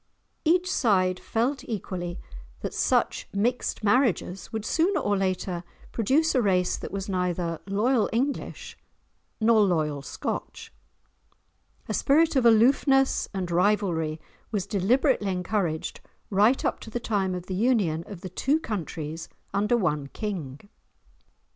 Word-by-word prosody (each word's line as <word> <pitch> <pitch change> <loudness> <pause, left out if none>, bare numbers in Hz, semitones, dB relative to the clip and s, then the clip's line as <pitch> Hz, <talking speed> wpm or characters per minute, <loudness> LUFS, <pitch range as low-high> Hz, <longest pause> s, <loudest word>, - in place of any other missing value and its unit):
Each 360 +3 +3
side 185 - +2
felt 250 +5 -1
equally 180 -5 -4 0.4
that - - -4
such - - +1
mixed 230 +3 -1
marriages 205 -4 +1
would 220 -2 -4
sooner 355 - +2
or 205 0 +1
later 185 -2 -1 0.3
produce 275 +9 +2
a 255 - +3
race 185 -4 +2
that - - -7
was 195 0 -4
neither 180 -3 -1
loyal 215 +4 +2
English 265 +5 -2 0.6
nor 225 -1 +5
loyal 155 -7 +1
Scotch. - - -5 1.1
A - - -2
spirit 310 +3 +3
of 255 -3 +4
aloofness 270 +4 +4
and 185 -3 -3
rivalry 175 -4 +1 0.3
was 205 -5 -2
deliberately 220 +2 +2
encouraged, 180 -3 -2 0.3
right 210 +7 +3
up - - 0
to - - -10
the 240 - -3
time 195 -5 -1
of 180 -1 -6
the 185 - -5
union 195 -7 +1
of 195 -4 -9
the 185 - -6
two 275 - +1
countries 165 - -5 0.2
under 210 +4 +2
one 150 -9 0
king. 155 -7 -5
200 Hz, 130 wpm, -26 LUFS, 180-240 Hz, 1.1 s, nor